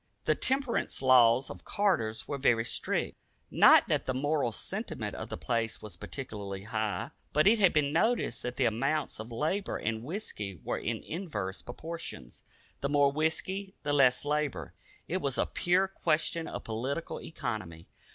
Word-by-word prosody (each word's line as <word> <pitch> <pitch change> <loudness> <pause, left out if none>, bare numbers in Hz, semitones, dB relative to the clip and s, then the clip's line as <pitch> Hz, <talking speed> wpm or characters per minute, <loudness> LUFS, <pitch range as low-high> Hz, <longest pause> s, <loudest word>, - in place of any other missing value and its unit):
The - - +3
temperance 265 - 0
laws 125 -1 +6
of - - -10
Carter's 125 - 0
were 140 - -3
very 115 -4 +3
strict. - - -2 0.3
Not - - +7
that - - 0
the 130 - 0
moral 145 -2 +1
sentiment - - -4
of - - -6
the - - -4
place 115 -2 -1
was 105 - -8
particularly 100 -7 -6
high, 110 -1 -2 0.2
but 150 +1 +4
it 220 +2 +6
had 195 -4 +6
been 145 -1 +1
noticed 220 - +1
that 125 0 -4
the 130 - +2
amounts 135 +7 0
of 110 +2 -7
labor 160 - -1
and 110 0 -2
whisky 115 - -5
were - - -2
in - - -3
inverse 130 - -4
proportion. 160 - -7 0.5
The 140 - -1
more 145 -1 +4
whisky, 185 +6 -1
the 145 0 0
less 135 -2 +4
labor. 150 -2 -1 0.3
It 180 - -1
was 140 -7 -1
a - - +2
pure 185 +2 +2
question 165 -2 0
of - - -6
political 130 +8 -3
economy. 85 - -5
140 Hz, 160 wpm, -30 LUFS, 115-165 Hz, 0.5 s, Not